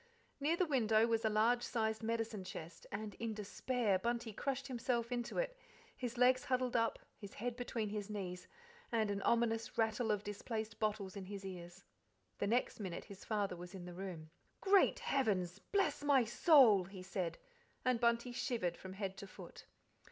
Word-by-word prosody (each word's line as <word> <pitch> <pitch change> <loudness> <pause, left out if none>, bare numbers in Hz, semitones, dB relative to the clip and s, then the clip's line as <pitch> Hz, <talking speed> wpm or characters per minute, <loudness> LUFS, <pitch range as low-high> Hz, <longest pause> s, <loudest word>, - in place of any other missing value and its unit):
Near 310 +4 +2
the 365 - +3
window 225 -7 +4
was 230 -1 +1
a 220 - +3
large 225 +3 +3
sized 220 -2 -1
medicine 225 -3 -2
chest, 170 -2 -8
and 210 0 -4
in 230 -2 -2
despair 210 0 0
Bunty 235 0 -1
crushed 275 +4 -2
himself 240 -2 -1
into 240 -1 -2
it, - - 0 0.4
his 245 -1 -4
legs 255 +1 +5
huddled 255 -1 0
up, 230 -1 +2 0.2
his 200 -1 -9
head 240 +2 -3
between 240 -3 -2
his 210 0 -4
knees, 180 -4 -5 0.4
and 220 -3 +2
an 200 0 -2
ominous 230 0 +1
rattle 225 0 +1
of 210 -1 +1
displaced 215 +1 -4
bottles 210 -3 -1
in 195 -2 -5
his 195 0 -7
ears. 175 0 -8 0.6
The - - +1
next 235 +3 +1
minute 185 -5 -4
his 200 -1 -11
father 205 -4 -1
was 175 +2 -9
in 180 -2 -7
the 180 - -7
room. 175 -4 -6 0.3
"Great 395 0 +5
Heavens! 195 -9 0
God - - -32
bless 395 -7 +2
my 280 -3 +5
soul!" 235 - +6
he 190 0 -9
said, 185 -2 -3 0.5
and 255 -2 +3
Bunty 235 +1 +2
shivered 235 -8 -1
from 190 0 -8
head 195 -1 -4
to 200 - -7
foot. - - -11
220 Hz, 180 wpm, -37 LUFS, 195-240 Hz, 0.6 s, soul